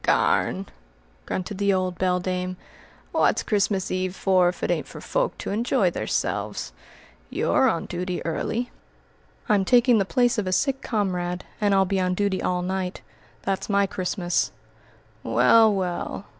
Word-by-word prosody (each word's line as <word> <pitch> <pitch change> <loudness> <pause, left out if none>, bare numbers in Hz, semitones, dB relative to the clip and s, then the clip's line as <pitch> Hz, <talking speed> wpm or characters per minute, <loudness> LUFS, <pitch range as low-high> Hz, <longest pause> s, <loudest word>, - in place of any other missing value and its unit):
"Garn!" 95 +2 +2 0.6
grunted 185 +2 -4
the 200 0 +3
old 185 -2 -1
beldame. 185 0 -1 0.6
"Wot's - - +2
Christmas 200 -2 0
Eve 185 0 -2
for, 185 -3 +3
if 180 - -7
it - - +1
ain't - - -1
for - - -10
folk - - -1
to - - -5
enj'y 230 +4 +1
theirselves? - - -2 0.6
Y'are 265 - +2
on 165 - -2
duty 180 0 -3
early." 230 +9 -2 0.8
"I'm 205 -2 +3
taking 240 +2 +4
the - - +3
place 245 +3 +2
of 200 - -2
a - - 0
sick 270 +7 +1
comrade, 180 -5 -2 0.2
and 205 -1 +3
I'll 195 0 +4
be 190 +1 0
on 180 0 0
duty 200 -1 0
all 180 -1 0
night. 185 0 -3 0.4
That's 195 +1 -2
my 200 -1 +3
Christmas." 180 - -1 0.7
"Well! 125 - +5
well! 190 0 -3
190 Hz, 150 wpm, -24 LUFS, 180-205 Hz, 0.8 s, Well